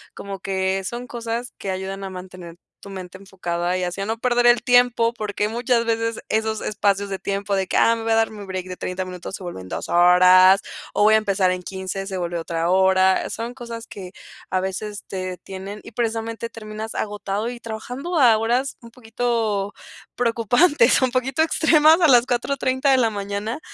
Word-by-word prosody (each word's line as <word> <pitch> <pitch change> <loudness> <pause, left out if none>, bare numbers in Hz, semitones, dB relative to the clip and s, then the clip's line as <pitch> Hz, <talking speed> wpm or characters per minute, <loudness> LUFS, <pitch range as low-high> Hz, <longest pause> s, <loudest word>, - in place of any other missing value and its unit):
como 195 -1 -7
que 190 0 -1
son 240 +5 -5
cosas 235 +1 -5
que 195 - -6
ayudan 190 +1 -5
a 190 - -4
mantener 180 -2 -10 0.3
tu 200 - -10
mente 185 -1 -8
enfocada 180 -2 -3
y - - -2
así 180 +2 -4
a 195 - -2
no 225 +1 -3
perder 245 -1 +2
el 240 -1 +6
tiempo, 245 -1 +3
porque 210 -1 -2
muchas 235 0 0
veces 230 0 -1
esos 220 0 -1
espacios 200 -1 0
de 195 - -3
tiempo 200 0 -2
de 190 - 0
que - - -1
ah, 230 - +4
me 225 - -6
voy 225 - -1
a - - +4
dar 225 0 +2
mi 205 -2 -9
break 185 -1 -5
de 180 - -7
30 185 +1 -4
minutos 180 +1 -8
se - - -11
vuelven 95 - -7
2 - - -5
horas 185 +2 +6 0.3
o - - 0
voy 215 +1 +6
a - - +7
empezar 195 -3 +1
en 180 0 -2
15, 190 +1 -5
se 190 -1 -5
vuelve 175 -1 -3
otra 165 +1 -2
hora, 190 0 +3
son 235 +2 -5
cosas 235 -2 -8
que, 185 -2 -9 0.4
a 185 - +1
veces, 200 +2 -5
te - - -8
detienen 190 +2 -7
y, - - -12
precisamente, 230 0 -3
terminas 215 -1 -7
agotado 210 +1 -3
y 245 -1 -7
trabajando 250 +9 -4
a 235 -4 +6
horas 245 +5 0
un 230 - -12
poquito 225 -4 -2 0.4
preocupantes 245 - +3
un 260 - +3
poquito 260 +4 0
extremas 320 0 +5
a 330 - +6
las 245 -2 +5
4:30 260 +2 0
de 265 - +5
la 230 -3 +3
mañana. 205 +5 -4
210 Hz, 195 wpm, -22 LUFS, 190-235 Hz, 0.4 s, a